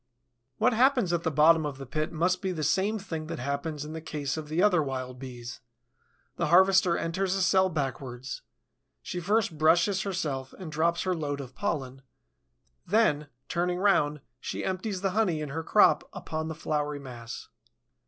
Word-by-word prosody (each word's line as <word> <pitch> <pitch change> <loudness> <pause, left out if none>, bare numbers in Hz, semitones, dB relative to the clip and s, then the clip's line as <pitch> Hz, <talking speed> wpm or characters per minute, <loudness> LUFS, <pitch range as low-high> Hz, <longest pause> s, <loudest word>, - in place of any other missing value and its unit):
What 245 +2 +3
happens 245 -6 +3
at 170 - +1
the 165 - 0
bottom 160 +2 +5
of 145 -3 -4
the 135 - -7
pit 155 +4 -2
must 180 +3 +1
be 190 - -1
the 160 -4 -3
same 190 +8 +1
thing 165 -6 -5
that - - -4
happens 140 +3 -3
in 155 - -7
the 160 - -5
case 145 -3 -3
of 155 -1 -5
the 155 +3 -1
other 185 -6 +4
Wild 130 -3 -4
Bees. 120 -2 -8 0.8
The - - 0
harvester 185 +1 +5
enters 185 +3 -1
a 195 - 0
cell 190 0 +4
backwards; 135 -4 -4 0.6
she 180 - -4
first 195 -3 0
brushes 170 +5 +4
herself 155 -9 -3
and 180 -5 -7
drops 165 +2 +1
her 185 - +1
load 145 -4 -3
of 130 -2 -8
pollen; 135 -6 -3 0.8
then, 170 -8 +2 0.2
turning 175 +1 0
round, 150 -7 +2 0.2
she - - -4
empties 190 +1 -2
the 195 -1 0
honey 185 -6 +1
in 150 -1 -4
her 160 +4 -3
crop 210 +6 +4
upon 160 -4 -4
the 160 - -5
floury 150 -1 -2
mass. 120 -4 -8
160 Hz, 175 wpm, -28 LUFS, 145-185 Hz, 0.8 s, bottom